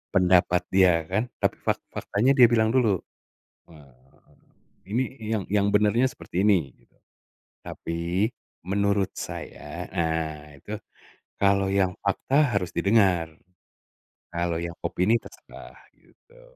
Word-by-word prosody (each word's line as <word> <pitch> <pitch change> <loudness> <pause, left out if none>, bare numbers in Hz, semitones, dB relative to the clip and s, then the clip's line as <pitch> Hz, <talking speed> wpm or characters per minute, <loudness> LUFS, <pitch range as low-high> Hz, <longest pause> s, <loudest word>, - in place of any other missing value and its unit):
pendapat 90 -1 +4
dia 90 -4 +4
kan, 110 +6 0 0.2
tapi - - +1
fak - - -1
faktanya 115 +7 +1
dia 120 - +9
bilang 110 -1 +2
dulu. 120 -6 +3 0.7
Eee, 70 -5 -20 0.6
"Ini 120 +5 +1 0.2
yang 110 -2 -2
yang 100 0 +2
benarnya 105 +5 +3
seperti 95 -7 -4
ini," 90 -9 +2
gitu. - - -32 0.7
"Tapi, 85 +5 -2 0.4
menurut 100 0 +1
saya," 85 +4 -7
nah 80 -4 -3
itu, 100 +9 -7 0.6
kalau 100 -1 +2
yang 95 -2 +1
fakta 125 +4 +2
harus 90 -2 -5
didengar, 95 -6 +2 1.0
kalau 85 -1 -1
yang 85 0 -5
opini 110 +6 +2
terserah, - - -14 0.2
gitu. - - -24
95 Hz, 115 wpm, -25 LUFS, 85-105 Hz, 1.0 s, dia